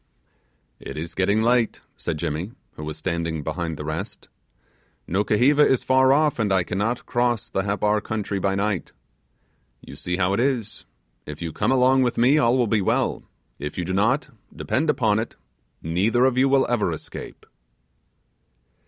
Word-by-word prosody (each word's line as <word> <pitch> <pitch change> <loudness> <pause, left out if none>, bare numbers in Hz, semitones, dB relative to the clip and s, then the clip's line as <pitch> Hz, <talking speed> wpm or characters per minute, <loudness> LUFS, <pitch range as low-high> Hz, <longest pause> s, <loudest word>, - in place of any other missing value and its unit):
'It - - -8
is 80 +2 -5
getting 100 +3 +1
late: 120 -1 +2
said 85 -3 -4
Jimmy, 80 +8 -3 0.2
who 75 - -9
was 75 0 -5
standing 85 -2 -3
behind 80 +1 -3
the 75 - -6
rest. 80 0 -6 0.8
'Nukuheva 115 - +3
is 130 -3 +3
far 130 0 +4
off, 150 -1 +2
and 105 -3 +1
I 95 -2 +3
cannot 105 +7 -2
cross 120 -2 0
the 95 - -1
Happar 105 +2 0
country 105 -2 -3
by 95 +1 0
night. 100 -2 -2 0.9
You 70 - -12
see 90 +5 -3
how 95 0 +1
it 100 - 0
is; 125 -4 -1 0.4
if 75 -1 -7
you 85 -2 -5
come - - 0
along 130 0 +4
with 125 -2 0
me, 130 +6 +4
all 120 0 +3
will 125 - +3
be 110 -1 +1
well; - - 0 0.4
if 75 +2 -6
you 90 - -2
do 95 - -3
not, 130 +9 +1 0.2
depend 155 +4 -1
upon 110 -7 +2
it, 115 - -5 0.5
neither 100 +10 +2
of 130 -2 +2
you 130 +2 +3
will 135 0 +4
ever 110 -7 0
escape. 80 - -8
105 Hz, 170 wpm, -23 LUFS, 90-125 Hz, 0.9 s, far